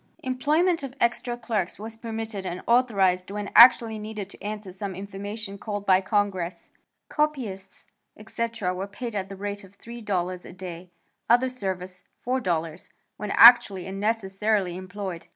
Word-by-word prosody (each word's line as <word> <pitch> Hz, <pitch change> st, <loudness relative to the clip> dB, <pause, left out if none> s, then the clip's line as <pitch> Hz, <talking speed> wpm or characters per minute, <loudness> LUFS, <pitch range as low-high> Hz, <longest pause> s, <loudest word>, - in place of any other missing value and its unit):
Employment 305 Hz, +7 st, +1 dB
of 270 Hz, -2 st, -7 dB
extra 240 Hz, 0 st, 0 dB
clerks 220 Hz, -6 st, -2 dB
was 220 Hz, +2 st, -8 dB
permitted 225 Hz, -3 st, -5 dB
and 185 Hz, -1 st, -5 dB
authorized 195 Hz, -7 st, +2 dB
when 205 Hz, 0 st, -5 dB
actually 230 Hz, -2 st, +8 dB
needed 210 Hz, -2 st, -6 dB
to -, -, -16 dB
answer 210 Hz, -2 st, -5 dB
some 190 Hz, 0 st, -6 dB
information 200 Hz, +1 st, -7 dB
called 205 Hz, -1 st, -4 dB
for 205 Hz, -, -7 dB
by 185 Hz, 0 st, +6 dB
Congress. 190 Hz, -3 st, -2 dB, 0.4 s
Copyists, 245 Hz, -11 st, -3 dB, 0.3 s
etc., 220 Hz, -3 st, -3 dB
were 190 Hz, +2 st, -4 dB
paid 230 Hz, +3 st, -6 dB
at 195 Hz, -2 st, -3 dB
the 195 Hz, -, -7 dB
rate 205 Hz, +1 st, -5 dB
of 195 Hz, +1 st, -17 dB
$3 190 Hz, -7 st, -4 dB
a -, -, -11 dB
day; 180 Hz, -1 st, -8 dB, 0.4 s
other 245 Hz, +2 st, +4 dB
service 185 Hz, -6 st, -5 dB, 0.2 s
$4 175 Hz, -10 st, -2 dB, 0.3 s
when 210 Hz, 0 st, -5 dB
actually 230 Hz, -5 st, +7 dB
and 195 Hz, +1 st, -6 dB
necessarily 205 Hz, -3 st, 0 dB
employed. 185 Hz, -1 st, -6 dB
205 Hz, 150 wpm, -25 LUFS, 190-230 Hz, 0.4 s, actually